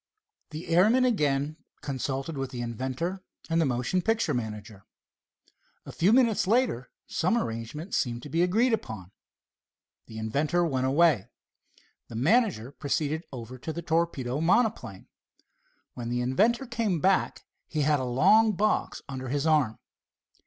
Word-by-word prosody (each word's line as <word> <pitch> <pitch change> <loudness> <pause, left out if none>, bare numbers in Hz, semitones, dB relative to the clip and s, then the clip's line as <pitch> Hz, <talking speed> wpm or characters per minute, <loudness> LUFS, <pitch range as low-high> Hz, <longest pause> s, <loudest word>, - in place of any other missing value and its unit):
The 155 +2 -7
airman 215 +10 +4
again 150 - 0 0.2
consulted 135 +2 -3
with 135 -1 -3
the 120 -1 -5
inventor 130 - -4 0.3
and 165 0 +3
the 160 - +2
motion 125 +8 0
picture 225 -6 +1
manager. 105 -4 -5 1.0
A - - -8
few 180 +5 +2
minutes 230 -5 +3
later 220 - +1 0.2
some 185 +8 0
arrangement 115 - -4
seemed 120 -1 -1
to 150 - -8
be 165 +5 +1
agreed 220 +8 +3
upon. 110 - -4 1.0
The 110 - -10
inventor 145 +10 0
went 130 -5 0
away. 135 - +3 0.8
The 115 - -10
manager 155 - +2
proceeded 150 +3 -2
over 125 0 -8
to 160 - -5
the 170 +2 -6
torpedo 155 -5 -1
monoplane. 165 - +1 0.9
When 120 -1 -6
the 120 0 -1
inventor 215 - +2
came 230 -8 -1
back 190 +4 +1 0.2
he 155 - -2
had 150 0 +3
a - - -2
long 200 - +4
box 210 +3 0
under 130 -2 -6
his 145 +2 -1
arm. 150 -9 +2
150 Hz, 140 wpm, -27 LUFS, 125-185 Hz, 1.0 s, airman